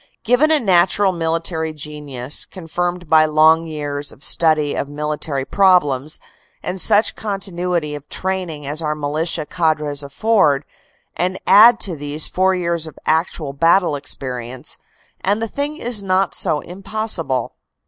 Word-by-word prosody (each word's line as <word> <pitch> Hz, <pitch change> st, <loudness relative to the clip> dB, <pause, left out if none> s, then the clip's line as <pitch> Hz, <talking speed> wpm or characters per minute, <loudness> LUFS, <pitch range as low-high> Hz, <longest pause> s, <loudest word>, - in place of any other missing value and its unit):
Given 250 Hz, +6 st, +3 dB
a 315 Hz, -1 st, +4 dB
natural 190 Hz, -1 st, +3 dB
military 165 Hz, -1 st, -2 dB
genius, 150 Hz, -3 st, -4 dB
confirmed 175 Hz, 0 st, -4 dB
by 155 Hz, 0 st, +5 dB
long 160 Hz, +2 st, +4 dB
years 145 Hz, -2 st, -4 dB
of 140 Hz, -, -16 dB
study 155 Hz, -3 st, +3 dB
of 140 Hz, -, -3 dB
military 150 Hz, -2 st, -3 dB
problems, 155 Hz, -8 st, +2 dB, 0.5 s
and 185 Hz, 0 st, -2 dB
such 210 Hz, +2 st, +3 dB
continuity 180 Hz, -6 st, -3 dB
of 145 Hz, 0 st, -9 dB
training 180 Hz, -6 st, -2 dB
as 150 Hz, +3 st, -2 dB
our 150 Hz, -1 st, -1 dB
militia 155 Hz, +2 st, -2 dB
cadres 150 Hz, -3 st, 0 dB
afford, 150 Hz, -1 st, +1 dB, 0.5 s
and 185 Hz, +1 st, -1 dB
add 230 Hz, +3 st, +7 dB
to 180 Hz, -4 st, +1 dB
these 145 Hz, +1 st, 0 dB
four 190 Hz, +1 st, +1 dB
years 170 Hz, -2 st, -2 dB
of 155 Hz, -, -12 dB
actual 155 Hz, -2 st, 0 dB
battle 165 Hz, +2 st, +3 dB
experience, 130 Hz, -3 st, -5 dB, 0.4 s
and 200 Hz, +3 st, +1 dB
the 225 Hz, -, -2 dB
thing 285 Hz, +6 st, -3 dB
is 240 Hz, -7 st, 0 dB
not 190 Hz, 0 st, +1 dB
so 150 Hz, -2 st, +1 dB
impossible. 185 Hz, -, -3 dB
160 Hz, 140 wpm, -19 LUFS, 150-190 Hz, 0.5 s, add